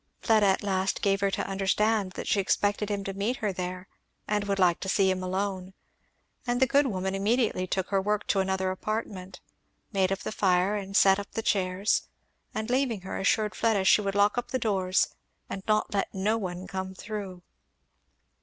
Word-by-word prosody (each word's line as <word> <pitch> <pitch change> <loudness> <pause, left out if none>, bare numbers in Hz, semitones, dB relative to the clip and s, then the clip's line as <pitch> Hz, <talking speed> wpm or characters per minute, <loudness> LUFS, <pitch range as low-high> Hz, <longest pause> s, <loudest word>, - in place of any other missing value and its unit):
Fleda 215 -3 +3
at 190 +1 +2
last 190 -1 -1
gave 195 -1 +2
her 200 - +2
to - - -2
understand 195 +1 +1
that - - -6
she 205 - +2
expected 205 +2 +1
him 200 -1 -2
to 195 - -4
meet 205 +6 -1
her 210 -5 -2
there 180 0 -5 0.4
and 210 -1 0
would 200 -1 -1
like 180 -3 +3
to 190 - -4
see 190 0 +3
him 185 0 -2
alone; 190 0 -3 0.7
and 245 0 +1
the 265 - +5
good 280 +2 +3
woman 190 -4 -2
immediately 205 -1 +1
took 190 0 -2
her 195 -1 +2
work 210 +1 0
into 195 - +1
another 190 0 0
apartment, 190 -2 -5 0.5
made 190 -1 +1
up 195 - +1
the - - -5
fire 190 0 +2
and 195 -1 -2
set 195 0 +5
up 200 - -7
the 225 - -3
chairs, 190 0 +1 0.4
and 220 +2 -3
leaving 250 -6 +1
her 190 - -5
assured 210 +1 +1
Fleda 220 -3 +1
she 210 - +6
would 200 -1 -2
lock 205 +3 +3
up 245 - -6
the 260 - 0
doors 195 -5 +1 0.4
"and 195 - -4
not 215 -1 +1
let 200 - 0
no 205 +4 +1
one 185 -4 -4
come 190 0 -5
through." 195 -4 -6
195 Hz, 195 wpm, -28 LUFS, 190-210 Hz, 0.7 s, she